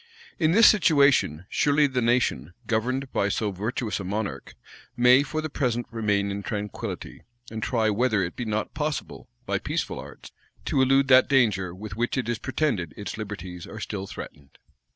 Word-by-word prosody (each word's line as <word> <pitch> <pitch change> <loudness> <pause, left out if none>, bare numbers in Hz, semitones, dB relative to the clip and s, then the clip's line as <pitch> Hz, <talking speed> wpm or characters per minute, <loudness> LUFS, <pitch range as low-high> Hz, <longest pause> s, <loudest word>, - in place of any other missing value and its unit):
In 160 -2 +3
this 225 +3 +7
situation, 140 - +4
surely 145 0 +3
the 130 -3 0
nation, 115 - 0
governed 130 +4 -1
by 100 - +1
so 105 0 -1
virtuous 105 +3 -3
a - - -5
monarch, 100 +2 -4 0.4
may 125 +2 +6
for 155 +2 -3
the 155 - -3
present 120 -4 -1
remain 105 -3 0
in 100 +1 -4
tranquillity, 105 0 -5 0.3
and 110 -1 -5
try 110 -2 +1
whether 110 -2 +1
it 90 - -4
be 125 - -4
not 110 0 -2
possible, 150 -1 -4 0.2
by - - -1
peaceful - - -3
arts, - - -11 0.3
to 135 - +1
elude 135 +1 +4
that 130 0 +6
danger 105 -9 +2
with 105 +1 -8
which 120 +4 -1
it 130 - -1
is 120 -1 -2
pretended 120 - -1
its 100 - -5
liberties 95 -5 -7
are 110 - -8
still 100 -2 -5
threatened. 75 -7 -10
110 Hz, 175 wpm, -25 LUFS, 100-130 Hz, 0.4 s, this